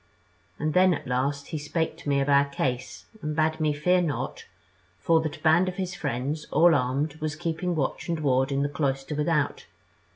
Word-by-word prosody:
And 155 0 -1
then, 185 -1 +5
at - - -8
last, 135 +3 -1
he 155 - -3
spake 160 +2 -2
to - - -5
me 140 -1 +3
of 135 - -1
our 140 0 +5
case, 130 -3 -3 0.2
and 150 0 -3
bade 155 0 +1
me 155 -1 +2
fear 180 +5 +2
not, 155 -5 -3 0.5
for 160 - +3
that 155 0 -4
a - - -19
band 170 +3 +4
of 180 - -7
his 185 -1 -3
friends, 140 +6 -3
all 170 +3 +5
armed, 140 +3 0
was 155 -1 -2
keeping 170 +1 -2
watch 150 +3 -2
and 165 -2 -1
ward 135 -2 +1
in 140 0 +1
the - - +1
cloister 140 0 -2
without. 150 0 0
150 Hz, 200 wpm, -26 LUFS, 140-160 Hz, 0.5 s, then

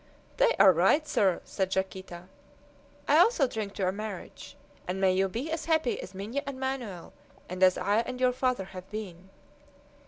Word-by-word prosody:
"They - - +4
are 190 - +7
right, 195 - +3
sir," 195 - +2
said 190 -1 -2
Yaquita. 190 -2 -4 0.8
"I - - +5
also 440 - +5
drink 215 -4 -5
to 200 - -3
your 185 - +2
marriage, 210 0 -8 0.3
and 185 +1 -3
may 190 -1 +3
you 190 +1 +1
be 250 +11 -4
as 325 - -3
happy 315 -6 +1
as - - -10
Minha 215 +9 -3
and 270 -2 -5
Manoel, 255 -9 -4 0.3
and 180 +1 -7
as 185 -1 +5
I 205 +1 +1
and 250 +2 -2
your 255 -1 +3
father 255 -5 0
have 185 0 -9
been!" 190 -4 -7
205 Hz, 180 wpm, -28 LUFS, 190-255 Hz, 0.8 s, are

